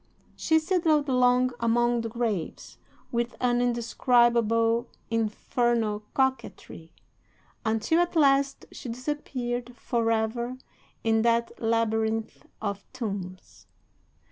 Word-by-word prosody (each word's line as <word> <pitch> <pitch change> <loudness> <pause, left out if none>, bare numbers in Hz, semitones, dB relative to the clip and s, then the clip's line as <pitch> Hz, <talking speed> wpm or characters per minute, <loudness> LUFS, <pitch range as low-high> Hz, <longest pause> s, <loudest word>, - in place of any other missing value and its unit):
She 320 - +2
sidled 320 -3 +2
along 250 0 +3
among 240 +1 +2
the 230 - -4
graves 225 -6 -4 0.3
with 235 0 -1
an 245 -1 +2
indescribable, 235 -1 +2 0.2
infernal 225 -1 0
coquetry, 265 -10 -2 0.7
until 225 +8 +1
at 350 0 0
last 275 -2 +3
she 250 - -8
disappeared 245 -2 -4
for 235 -2 -1
ever 235 +3 -1 0.5
in 225 0 +2
that 235 0 +2
labyrinth 225 -1 -1
of 200 -2 -4
tombs. 195 -7 -6
235 Hz, 95 wpm, -27 LUFS, 225-250 Hz, 0.7 s, along